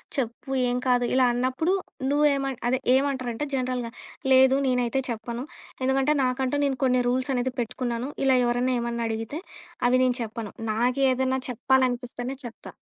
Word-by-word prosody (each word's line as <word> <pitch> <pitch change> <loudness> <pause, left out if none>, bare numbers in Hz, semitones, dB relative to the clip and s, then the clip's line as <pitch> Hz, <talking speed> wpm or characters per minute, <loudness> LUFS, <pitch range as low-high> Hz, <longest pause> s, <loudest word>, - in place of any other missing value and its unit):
చెప్పు 245 0 -3 0.2
ఏం 245 - 0
కాదు" 245 -1 +3
ఇలా 260 0 +4
అన్నప్పుడు 260 +9 0 0.4
నువ్వేమ 280 -2 +2 0.2
అదే 260 +1 +1 0.2
ఏమంటారంటే 265 -1 -1
జనరల్‌గా, 250 -2 -2 0.4
లేదు, 265 +1 +6
నేనైతే 250 +1 +1
చెప్పను. 235 +3 -4 0.4
ఎందుకంటే 270 +3 +2
నాకంటూ 255 +2 0
నేను 270 -2 0
కొన్ని 255 -1 +3
రూల్సనేది 255 0 0
పెట్టుకున్నాను. 240 +2 -3 0.2
ఇలా 265 -1 +5
ఎవరన్నా 245 +1 +1
ఏమన్నా 235 0 -2
అడిగితే, 225 +7 -4 0.5
అవి 255 +1 +4
నేను 250 0 +2
చెప్పను. 220 -1 -5 0.2
నాకు 245 +4 +1
ఏదన్నా 260 +1 0
చెప్పాలనిపిస్తేనే 250 +1 0
చెప్తా. 230 - -9
255 Hz, 135 wpm, -26 LUFS, 245-265 Hz, 0.5 s, లేదు